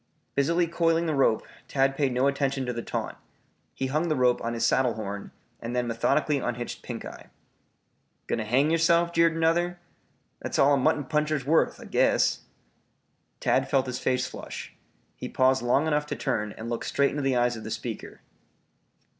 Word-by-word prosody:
Busily 170 +5 +2
coiling 165 0 +1
the 160 - 0
rope, 135 -6 +2 0.2
Tad 135 0 +1
paid 140 -2 +1
no 125 +2 +1
attention 140 -1 0
to 125 - -2
the 115 - -4
taunt; - - -4 0.6
he 135 - -2
hung 155 +6 0
the 155 - +1
rope 125 -1 +2
on 115 0 -2
his 115 0 0
saddle 125 -1 +2
horn 100 -2 -5 0.3
and 120 +2 -4
then 125 0 +1
methodically 140 +5 +1
unhitched 120 -1 -4
Pinkeye. - - -8 1.0
"Going - - -2
to 110 - -3
hang 135 +8 +2
yerself?" 170 +1 +3
jeered 165 -1 +3
another. 170 +2 +1 0.6
"That's - - -3
all 140 +1 +5
a - - +4
mutton 145 +2 +2
puncher's 150 -1 -1
worth. 160 +3 +2
I - - -10
guess." - - +2 1.0
Tad 135 0 +1
felt 135 -1 +2
his 125 -1 -4
face 125 0 0
flush. - - -8 0.4
He - - -6
paused 130 0 +3
long 125 +5 +2
enough 150 -1 0
to - - -3
turn 105 -6 -2
and 110 - -6
look 120 0 -3
straight 140 0 +1
into 145 - -3
the 135 -2 +1
eyes 120 0 +2
of 110 - -8
the - - -6
speaker. - - -6
135 Hz, 180 wpm, -27 LUFS, 125-155 Hz, 1.0 s, all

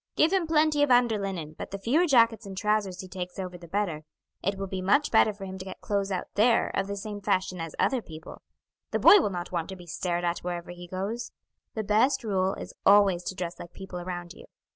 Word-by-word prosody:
Give 325 +4 +3
him 370 -4 +2
plenty 310 -2 +3
of 290 - +3
under 245 -3 +4
linen, 180 -6 -4
but - - -5
the 195 - -5
fewer 280 - +2
jackets 230 -5 +4
and 190 -1 -8
trousers 205 -3 0
he 185 - -9
takes 180 -1 -6
over 185 -2 -5
the 175 -1 -11
better; 175 -4 -1 0.4
it 195 +1 -1
will 195 - -3
be 190 -1 -4
much 205 +11 +2
better 220 -1 +5
for 200 -1 -9
him 190 0 -7
to 185 - -7
get 190 - -8
clothes 200 -1 -1
out 185 - -2
there 230 +3 +3
of 195 - 0
the 200 - -3
same 205 0 -6
fashion 185 -2 0
as 165 -1 -6
other 260 -3 +1
people; 160 -5 -11 0.5
the - - 0
boy 410 - +8
will 265 - +1
not 175 -2 -5
want 170 -1 -2
to 190 - -6
be 180 -1 -12
stared 175 +1 -2
at 175 0 0
wherever 175 -1 -5
he 175 0 -10
goes. 200 +6 -4 0.4
The 220 - -2
best 220 +7 +2
rule 190 -3 0
is - - -8
always 200 -3 +5
to 190 - -4
dress 175 -2 -5
like 175 - -10
people 190 -2 -7
around 175 -1 -6
you. - - -14
195 Hz, 240 wpm, -27 LUFS, 180-215 Hz, 0.5 s, boy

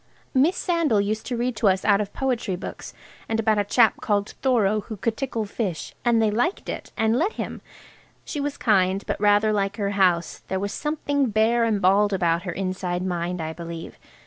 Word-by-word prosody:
Miss 295 +8 +3
Sandal 330 - +1
used 210 +2 -2
to 245 - -2
read 245 +1 -1
to 215 - +2
us 190 -1 +2
out 205 -1 +4
of 205 - -4
poetry 240 -7 -1
books, 180 - -8 0.3
and 225 0 0
about 215 -1 +2
a - - +2
chap 225 +2 +3
called 205 -1 0
Thoreau, 215 -6 +2
who 215 +1 -7
could 225 +3 -1
tickle 235 -5 -3
fish, 200 -5 -4
and 235 -1 +3
they 220 -1 +3
liked 245 - -1
it, - - -6
and 220 +2 +2
let 385 +7 +1
him. - - -5 0.6
She 295 - -4
was 285 0 -3
kind, 195 -3 +2
but - - -3
rather 210 +1 +4
like 200 -1 -1
her 200 -2 -1
house–there 190 -1 0
was 200 +1 -3
something 285 -2 -1
bare 220 +3 +2
and 220 -3 +1
bald 200 +2 +3
about 170 -3 +1
her - - -1
inside 185 -1 -3
mind, 175 -1 -2
I 160 0 -4
believe. 170 0 -8
210 Hz, 200 wpm, -24 LUFS, 190-235 Hz, 0.6 s, out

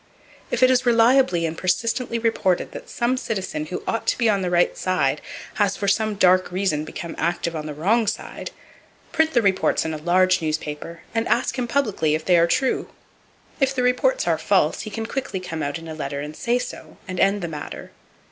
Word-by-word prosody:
If - - +1
it 255 - +7
is 255 0 +3
reliably 235 -6 +4
and 160 0 -3
persistently 230 +7 0
reported 225 -6 0
that - - -9
some 240 +2 0
citizen 190 -10 -3
who 180 - -5
ought 225 - -2
to - - +2
be 235 - +2
on 200 -2 +2
the 180 - -1
right 175 0 +2
side 185 0 0 0.4
has 200 -1 +2
for 200 - -2
some 215 +1 +1
dark 185 -2 +4
reason 180 -5 0
become 165 +1 -6
active 170 0 -1
on 155 -1 -4
the 150 - -5
wrong 215 +9 +2
side, 220 - -4 0.6
print 320 -1 +2
the 240 - +3
reports 190 -4 +2
in 160 - -2
a - - -3
large 185 +3 +3
newspaper, 155 +1 -4
and 225 0 0
ask 240 - +1
him 245 - -1
publicly 215 - +1
if 155 - -4
they 180 -2 +5
are 170 - +4
true. 260 +9 0 0.7
If 270 -1 +2
the 250 - 0
reports - - +2
are - - +2
false, - - +2
he 215 - -6
can 225 +2 -4
quickly 255 -5 -3
come 165 -3 -5
out 145 0 -2
in 165 0 -10
a 160 - -6
letter 140 -2 -4
and 150 +1 -6
say 240 +7 0
so, 250 - -7
and 185 -1 -4
end 195 0 +2
the - - -1
matter. 150 -3 -7
190 Hz, 210 wpm, -23 LUFS, 165-235 Hz, 0.7 s, it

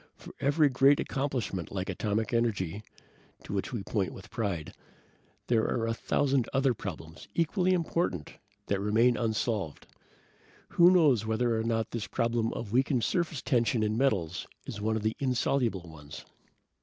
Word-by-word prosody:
For - - -12
every 145 +2 +3
great 135 +1 +4
accomplishment 130 - -2
like 95 -1 -3
atomic 105 +4 -1
energy, 105 -5 0 0.6
to - - -7
which 100 - -2
we 115 -6 -3
point 100 -3 -1
with 95 - -12
pride, 100 -9 -3 0.7
there 115 -2 +3
are 115 - 0
a 115 - 0
thousand 135 +1 +1
other 135 -1 +2
problems, 80 -6 -8
equally 180 +3 +2
important, 165 - -1 0.3
that 100 - 0
remain 110 +4 +3
unsolved. 110 - -2 0.8
Who 175 0 +6
knows 145 - +4
whether 115 +1 +1
or 110 - 0
not 115 -1 -1
this 115 -3 -3
problem 115 -1 0
of 110 -3 -6
weakened 130 0 +2
surface 170 -7 -1
tension 120 -2 +2
in 105 0 0
metals 95 -10 0 0.2
is 105 - -6
one 110 +1 0
of 110 - -2
the 110 0 0
insoluble 125 - 0
ones?" 75 -6 -11
115 Hz, 155 wpm, -29 LUFS, 100-130 Hz, 0.8 s, Who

